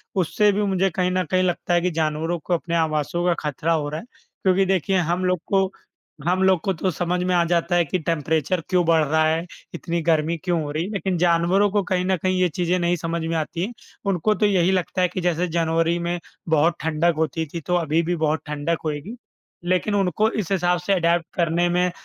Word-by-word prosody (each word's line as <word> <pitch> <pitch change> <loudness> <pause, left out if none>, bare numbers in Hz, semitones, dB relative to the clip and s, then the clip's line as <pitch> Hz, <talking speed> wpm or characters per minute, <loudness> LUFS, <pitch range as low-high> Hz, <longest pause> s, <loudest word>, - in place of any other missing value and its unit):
उससे 205 +3 +2
भी 205 +1 0
मुझे 195 -1 +1
कहीं 180 -1 +1
न 185 0 +1
कहीं 185 0 +3
लगता 175 0 -1
है 175 - +3
कि 180 - 0
जानवरों 160 +1 -1
को 175 - -3
अपने 170 0 -1
आवासों 160 +1 0
का 175 - +3 0.2
खतरा 160 +4 -1
हो 150 -2 -1
रहा 155 +2 -4
है, - - -11 0.4
क्योंकि 190 0 +3
देखिए 190 0 +1
हम 175 +1 0
लोग 180 -2 +1
को 195 -1 +1 0.6
हम 185 +1 +2
लोग 190 -2 +4
को 195 - 0
तो 185 +3 -1
समझ 180 +1 -1
में 180 0 0
आ 175 - +4
जाता 175 +1 +1
है 175 -1 +3
कि 180 +5 -2
टेम्परेचर 160 +1 0
क्यों 180 -2 +3
बढ़ 160 -1 +4
रहा 155 +2 +2
है, 165 +2 0 0.3
इतनी 170 0 -3
गर्मी 160 0 +1
क्यों 175 -3 0
हो 145 - -5
रही 155 +3 -1
है, 195 - -5
लेकिन 190 -3 -1
जानवरों 175 +4 +3
को 205 -2 +1
कहीं 185 -1 -1
न 190 -1 +1
कहीं 185 0 +1
ये 180 - +3
चीज़ें 180 +3 0
नहीं 175 0 +1
समझ 165 0 -3
में 165 0 -2
आती 165 +3 -2
हैं। 240 - -7 0.4
उनको 195 +4 +1
तो 210 - +1
यही 190 -2 +3
लगता 185 0 -1
है 180 - +4
कि 180 +1 -5
जैसे 175 0 0
जनवरी 165 +1 +1
में 175 +1 -2 0.3
बहुत 160 +2 +3
ठंडक 160 +2 +1
होती 160 0 -1
थी, 170 - -4
तो 180 +4 -1
अभी 165 -1 +1
भी 175 +2 -1
बहुत 155 0 0
ठंडक 150 +2 -1
होएगी। 155 +9 -4 0.5
लेकिन 185 +3 +1
उनको 200 +3 +2
इस 200 -3 -3
हिसाब 180 -2 +2
से 195 +3 0
अडॉप्ट 170 -1 +2
करने 170 0 +1
में 180 +1 +1
175 Hz, 230 wpm, -23 LUFS, 165-185 Hz, 0.6 s, लोग